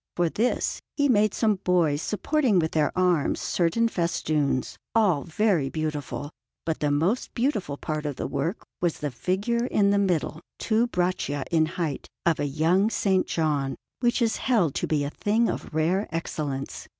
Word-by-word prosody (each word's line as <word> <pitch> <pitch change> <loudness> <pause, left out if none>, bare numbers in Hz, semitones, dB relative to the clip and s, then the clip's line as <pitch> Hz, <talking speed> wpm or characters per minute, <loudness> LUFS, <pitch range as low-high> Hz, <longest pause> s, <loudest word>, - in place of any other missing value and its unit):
For 175 -1 +2
this 230 +9 0 0.2
he 285 -1 +3
made 215 -5 +4
some 215 -3 +2
boys 165 -5 +2
supporting 245 +1 +1
with 160 -2 +1
their 150 -2 +2
arms 180 -5 +2
certain 185 +7 +1
festoons, 155 - -1 0.2
all 195 -10 +4
very 170 - +1
beautiful; 150 -2 -4 0.3
but 160 -1 -1
the 150 - +1
most 165 - +1
beautiful 230 - -1
part 155 0 -3
of 145 - -3
the - - -4
work 165 +9 -2 0.2
was 175 -2 +1
the 145 -1 -3
figure 200 - -1
in 200 -5 +3
the 200 - +3
middle, 175 -4 0 0.2
two 230 +2 +1
braccia 175 - -1
in 160 -2 +3
height, 160 -4 -3 0.2
of 170 -2 +2
a - - 0
young 165 +7 +2
S. 220 - -2 0.2
John, 145 -4 0 0.2
which 240 0 +2
is 225 - +1
held 205 - +2
to - - -2
be 150 -2 +1
a 140 - -3
thing 220 +6 +1
of - - -4
rare 170 +6 +1
excellence. 150 -5 -4
170 Hz, 170 wpm, -26 LUFS, 150-210 Hz, 0.3 s, made